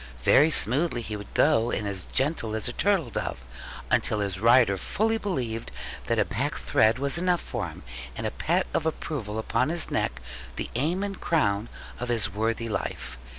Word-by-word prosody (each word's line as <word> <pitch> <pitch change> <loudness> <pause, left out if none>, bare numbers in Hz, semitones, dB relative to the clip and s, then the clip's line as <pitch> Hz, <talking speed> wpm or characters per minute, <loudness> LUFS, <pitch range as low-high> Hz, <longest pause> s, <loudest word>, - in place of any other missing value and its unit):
Very 150 - +6
smoothly 135 -2 +3
he 110 -1 -5
would 105 0 -9
go, 130 -6 +4
and 105 - -2
as 95 -3 -4
gentle 130 -6 0
as 110 - -2
a - - -3
turtle 190 - +1
dove; 65 - -4 0.5
until 110 - +2
his 100 -2 -2
rider 115 -1 +5
fully 225 - 0
believed 125 - -3 0.4
that - - +1
a - - +3
pack - - -2
thread 110 +2 +3
was 140 +4 +1
enough 180 -1 +2
for - - -4
him, - - -11 0.3
and - - -4
a - - -1
pat - - 0
of 160 - 0
approval 125 -9 -3
upon 125 +5 0
his 170 0 -1
neck 65 - -1 0.4
the - - -5
aim 160 +10 0
and 200 -2 -5
crown 105 -9 +1 0.3
of 125 - -4
his 110 -5 0
worthy 115 +2 -1
life. 65 - -4
120 Hz, 185 wpm, -26 LUFS, 105-160 Hz, 0.5 s, Very